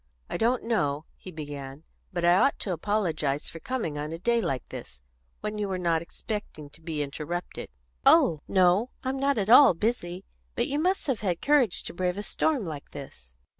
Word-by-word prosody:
"I - - -1
don't 240 +2 +1
know," 155 -10 0
he - - -11
began, 145 -3 -7 0.3
"but 175 -2 -1
I 175 - +6
ought 275 - +3
to 190 - -1
apologise 165 -7 -1
for 165 - -9
coming 195 - -3
on 150 +1 -4
a 165 - -4
day 235 +6 +1
like 135 - -2
this, 65 -1 -9 0.4
when 210 0 -3
you 205 -1 -1
were 190 - -1
not 170 -2 +1
expecting 170 -5 -6
to 160 - -17
be 160 -2 -2
interrupted." 155 +5 -5 0.3
"Oh 155 -3 +5
no; 185 +5 +3
I'm 265 +1 -2
not 275 -1 +2
at 205 +1 +1
all 255 -6 +9
busy. 185 -3 -2 0.3
But - - +1
you 285 +2 -1
must 370 +4 +1
have 265 -7 0
had 180 -5 -1
courage 280 -10 +3
to - - -7
brave 180 +1 -1
a 205 - -3
storm 280 -1 0
like 150 -4 -7
this." 65 - -11
180 Hz, 195 wpm, -27 LUFS, 155-225 Hz, 0.4 s, all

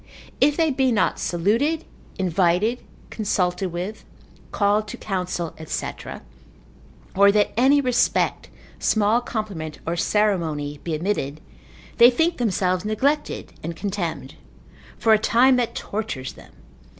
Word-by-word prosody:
If 290 +2 +3
they 325 -2 +2
be 260 -1 +2
not 220 - +1
saluted, 230 - 0 0.3
invited, 185 +5 +1 0.3
consulted 185 -3 -1
with, 180 +5 -5 0.5
called 205 +1 +1
to - - -7
counsel, 180 -4 -3
&c., 155 - -3 1.2
or 200 +1 +6
that 205 0 +2
any 270 +5 +4
respect, 250 -2 +1 0.3
small 220 +2 +2
compliment, 200 -10 -5
or 165 - -1
ceremony 165 -8 0
be 165 -2 -2
omitted, 155 -4 -2 0.6
they 235 0 +9
think 325 +7 +1
themselves 185 -5 0
neglected, 270 +8 -1
and 165 +1 -5
contemned; 190 -4 -4 0.6
for 225 - +4
a 215 - +5
time 250 +4 +4
that 240 -2 -1
tortures 200 -12 -4
them. - - -16
205 Hz, 120 wpm, -23 LUFS, 175-240 Hz, 1.2 s, they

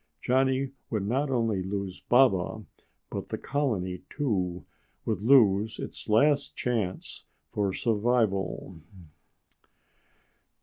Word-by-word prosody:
Johnny 130 +3 +1 0.2
would 105 -4 -1
not 135 +6 0
only 115 -6 +1
lose 95 -1 -4
Baba, 110 -5 +3 0.5
but - - -5
the - - -3
colony, 105 -11 -2
too, 90 - -2 0.4
would 105 -4 -1
lose 110 -3 +4
its - - -7
last 140 +7 +3
chance 110 -7 -3 0.3
for 100 -2 0
survival. 105 -6 0
110 Hz, 95 wpm, -28 LUFS, 95-130 Hz, 0.5 s, lose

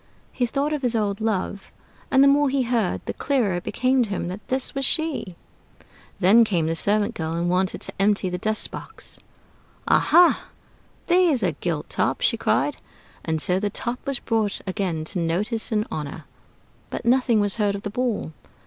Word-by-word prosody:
He 245 -2 -1
thought 285 +5 -1
of 300 - -2
his 245 -3 0
old 205 -2 -1
love; 200 -2 -2 0.4
and 265 0 +5
the - - +6
more 285 0 +4
he 270 -1 +1
heard, 230 -6 0
the - - -3
clearer 240 -10 0
it 175 - -6
became 255 +1 +1
to 230 - 0
him 185 -3 -3
that 195 +3 -8
this 260 0 -1
was 275 - -2
she. 280 - -1 0.8
Then 210 +5 +6
came 180 -7 0
the 165 +1 -1
servant 210 +5 +1
girl, 160 -5 -3
and 170 +1 -1
wanted 185 +1 0
to - - -4
empty 205 -1 +2
the 180 0 -3
dust 215 +3 -1
box. - - -8 0.7
"Aha, 350 0 +4 0.6
there's 345 -9 +3
a 180 - +2
gilt 155 0 -3
top!" - - -1
she - - +3
cried. - - 0 0.5
And 160 -1 -1
so 180 +4 +2
the 205 +1 -1
Top 240 +4 -4
was 275 -2 0
brought 220 -4 -1
again 185 -5 -2
to 180 +3 +1
notice 210 +9 -1
and 215 -1 +1
honor, 150 0 -5 0.6
but - - -5
nothing 245 -2 +3
was 205 0 +1
heard 205 -2 +1
of 200 - -7
the 205 - -4
Ball. 235 -8 -2
210 Hz, 185 wpm, -23 LUFS, 185-250 Hz, 0.8 s, the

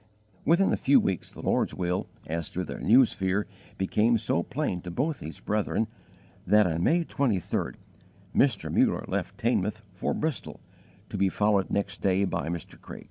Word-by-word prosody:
Within 175 +5 +4
a - - +1
few 140 +1 +5
weeks 95 -3 -2
the - - -11
Lord's - - +1
will, 90 0 -1 0.2
as 80 0 -3
to 90 - -3
their - - -6
new 125 +6 +6
sphere, 95 -1 -1 0.3
became 105 +5 +2
so 105 -6 0
plain 110 - -2
to 90 - -7
both 145 - -1
these 80 - -8
brethren 105 +1 0 0.6
that 105 0 +6
on 85 -1 0
May 170 - +3
23d 115 - -1 0.6
Mr. 130 -8 +2
Muller - - +3
left - - -3
Teignmouth 110 -2 0
for 95 - -2
Bristol, 155 -4 -3 0.5
to - - -4
be 95 -1 +3
followed 105 -1 +2
next 100 - -2
day 95 0 +2
by 75 - -2
Mr. 85 -2 -6
Craik. - - -9
100 Hz, 170 wpm, -28 LUFS, 90-120 Hz, 0.6 s, new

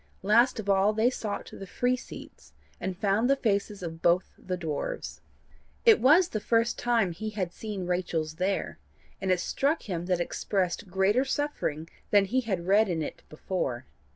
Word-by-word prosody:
Last 235 +5 +4
of 210 - -5
all 200 +1 +3
they 225 +3 +2
sought 215 -5 -4
the 195 - -8
free 245 +6 +1
seats, 250 - -12 0.3
and 185 -1 -4
found 205 +5 +1
the 275 - +5
faces 205 -5 -1
of 165 -1 -6
both 175 +2 +2
the 185 -1 -5
dwarfs. 160 -4 -4 0.6
It 450 -3 +7
was 330 +7 +6
the 215 - -2
first 230 +2 +1
time 230 -6 +2
he 215 +6 -5
had 190 -5 -3
seen 205 -3 -5
Rachel's 170 -3 -2
there, 190 - -1 0.4
and 190 - -2
it 180 - +3
struck 280 - 0
him 175 -3 -4
that 180 -2 +1
it - - +2
expressed 185 +1 -2
greater 195 +7 +2
suffering 265 - -2 0.2
than 205 -1 +5
he 255 +6 +1
had 190 -8 -3
read 205 +3 +4
in 165 -3 -1
it - - -7
before. 135 -6 -3
195 Hz, 180 wpm, -28 LUFS, 180-230 Hz, 0.6 s, It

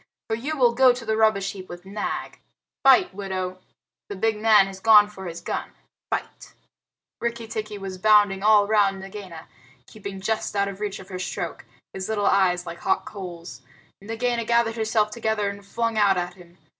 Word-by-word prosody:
For 220 - +1
you 290 +7 -4
will 245 -3 +4
go 255 +1 +6
to 245 -2 -8
the 220 0 0
rubbish 215 -3 +2
heap 190 -2 -10
with 175 +1 -10
Nag. 205 +2 -4 0.4
Fight, 265 -6 +6
widow! 185 -2 -4 0.5
The 200 - -5
big 220 +3 +1
man 215 -2 +5
has 195 -1 -9
gone 210 0 +7
for 190 -3 -9
his 170 0 -7
gun! - - -4 0.4
Fight!" - - -5 0.6
Rikki 235 -1 -3
tikki 215 -1 -5
was 190 -2 -7
bounding 205 -1 +4
all 210 0 +5
round 200 -2 +2
Nagaina, 190 -4 -9 0.4
keeping 200 -2 -8
just 215 +2 -2
out 200 0 +2
of 200 0 -7
reach 210 -2 -3
of 190 - -12
her 185 -1 -6
stroke, 185 - -5 0.3
his 190 +1 -5
little 210 -2 0
eyes 180 -3 +3
like 170 0 -7
hot - - 0
coals. 170 - -8 0.4
Nagaina 230 +3 -1
gathered 235 0 +2
herself 220 -1 +1
together 220 -2 -1
and 200 0 -11
flung 230 +2 -1
out 200 -2 +4
at 180 0 -2
him. 175 -1 -18
205 Hz, 180 wpm, -24 LUFS, 190-220 Hz, 0.6 s, gone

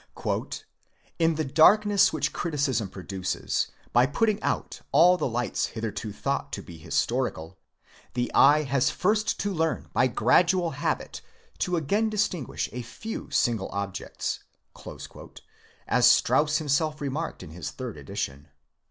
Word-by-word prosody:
"In 165 -1 +3
the 155 0 -1
darkness 200 +8 +5
which 145 -2 -1
criticism 140 - -1
produces, 95 0 -2 0.3
by 120 +2 +5
putting 210 +8 +1
out - - -2
all 180 +2 +6
the 180 - -1
lights 120 0 -1
hitherto 110 -1 -5
thought - - -3
to - - -4
be 85 -2 -11
historical, 80 +2 -2 0.6
the 120 0 -1
eye 150 +2 +6
has 135 -2 +1
first 215 +3 0
to 200 -1 -1
learn 160 -2 -1
by 130 - +4
gradual 170 - +3
habit 145 - -3 0.4
to 180 - 0
again 205 +9 +1
distinguish 195 - -1
a 125 - -5
few 220 - -7
single 110 -5 +1
objects," 100 -1 -4 1.5
as 125 -1 +4
Strauss 150 +4 +3
himself 155 0 0
remarked 145 +3 -4
in 75 - -10
his 90 +2 -6
third 125 -4 -6
edition. 75 -8 -5
140 Hz, 130 wpm, -26 LUFS, 115-170 Hz, 1.5 s, all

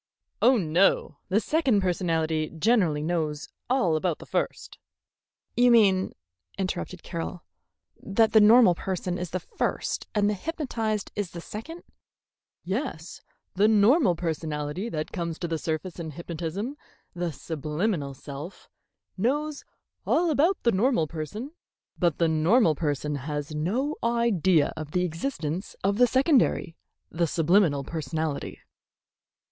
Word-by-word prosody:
"Oh, 255 0 +6
no; 165 -3 +2
the 195 +3 +3
second 255 -3 +2
personality 165 -4 0
generally 165 -5 +2
knows 155 -3 -2 0.2
all 245 -11 +2
about 160 0 0
the - - -12
first - - -3 0.4
" - - -56
"You 245 +1 +5
mean," 200 -5 +4 0.4
interrupted 185 -2 -4
Carroll, 170 0 -5 0.6
"that 220 +3 +2
the 220 - +6
normal 225 -2 +7
person 180 0 -3
is 180 -1 -4
the 185 - -2
first - - -3
and 205 -1 +3
the 210 - +2
hypnotized 225 - -3
is 205 -4 -2
the 175 - -8
second?" 265 - -8 0.8
"Yes. 190 - -4 0.3
The 210 - +4
personality 160 +3 -3
that 155 -7 -4
comes 170 -2 -3
to 175 - -3
the 165 -1 -2
surface 160 +3 -4
in 165 -2 -4
hypnotism, 170 - -5 0.4
the 175 -1 -2
subliminal 150 0 -3
self, 145 +6 -9 0.5
knows 285 +8 -1 0.4
all 345 -1 +3
about 330 +6 +2
the 235 - +4
normal 215 -3 +2
person, 170 - -6 0.5
but 175 -5 +2
the 170 - +3
normal 160 +5 +4
person 150 -1 -2
has 145 +2 -4
no 225 - -1
idea 200 -9 +2
of 155 -1 -7
the 180 - +2
existence 170 - -4
of 200 +3 +1
the 245 - +7
secondary, 260 - +2 0.4
the 170 +1 0
subliminal 165 -3 +3
personality." 155 0 -3
180 Hz, 130 wpm, -26 LUFS, 160-225 Hz, 0.8 s, normal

